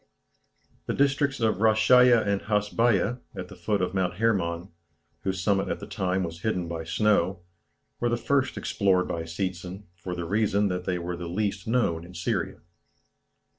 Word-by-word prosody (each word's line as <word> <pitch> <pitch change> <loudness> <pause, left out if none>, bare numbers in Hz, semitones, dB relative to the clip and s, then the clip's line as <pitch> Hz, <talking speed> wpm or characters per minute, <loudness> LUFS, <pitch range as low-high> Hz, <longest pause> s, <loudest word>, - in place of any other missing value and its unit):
The - - -1
districts 140 -1 +2
of 110 -4 +1
Rasheiya 115 +2 +5
and 100 -1 0
Hasbeiya, 105 +2 +1 0.2
at 90 -2 -6
the - - -10
foot 100 +2 -1
of 90 - -2
Mount 90 -2 0
Hermon 95 -4 0 0.5
whose 95 -2 -3
summit 95 0 +2
at - - -2
the - - -7
time 95 0 -1
was 85 -1 -6
hidden 90 -5 -1
by 85 -1 -4
snow 95 -1 +1 0.6
were 120 - +1
the 120 - +1
first 135 +2 0
explored 95 -3 +1
by 80 -1 -3
Seetzen, 90 +3 -4
for 90 0 -6
the 85 -1 -4
reason 105 +1 +1
that 90 0 -3
they 90 - 0
were 85 0 -4
the 85 0 -6
least 100 +1 -2
known 110 -9 +1
in 90 +1 -12
Syria. 85 - -2
95 Hz, 170 wpm, -27 LUFS, 90-110 Hz, 0.6 s, Rasheiya